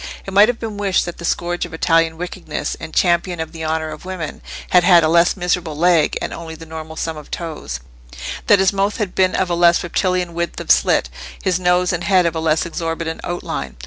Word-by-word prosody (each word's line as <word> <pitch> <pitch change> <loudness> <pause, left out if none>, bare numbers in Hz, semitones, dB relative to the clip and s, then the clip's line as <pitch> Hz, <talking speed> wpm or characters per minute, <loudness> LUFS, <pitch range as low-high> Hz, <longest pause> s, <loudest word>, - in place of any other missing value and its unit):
It 195 - -7
might 205 +2 +7
have 245 -1 -1
been 220 -3 -5
wished 200 -2 +1
that 175 - -7
the 170 - -6
scourge 175 +1 -1
of - - -6
Italian 165 -1 +2
wickedness 180 +1 -4
and 160 - -8
"Champion 175 0 +1
of 160 0 -4
the 165 -1 -7
honour 160 0 -2
of 155 - -9
women" 180 -4 -6 0.3
had 180 -1 +6
had 175 -2 +6
a - - +3
less 170 +4 +3
miserable 175 -3 -1
leg, 170 -1 +3
and - - -4
only 165 -1 -7
the 165 - -11
normal 160 0 -8
sum 160 0 -3
of 150 - -11
toes; 155 - -5 0.7
that 205 - +7
his 190 0 +3
mouth 200 +1 0
had 205 -5 -2
been 185 -1 +2
of 185 -2 0
a - - +2
less 170 0 +4
reptilian 180 0 -1
width 170 0 -3
of - - 0
slit, 65 0 +3 0.3
his 185 -1 +1
nose 180 0 +2
and 175 0 -2
head 185 -3 +4
of 170 - +1
a - - -1
less 160 0 +1
exorbitant 165 -1 -4
outline. 70 - -4
170 Hz, 225 wpm, -19 LUFS, 160-180 Hz, 0.7 s, might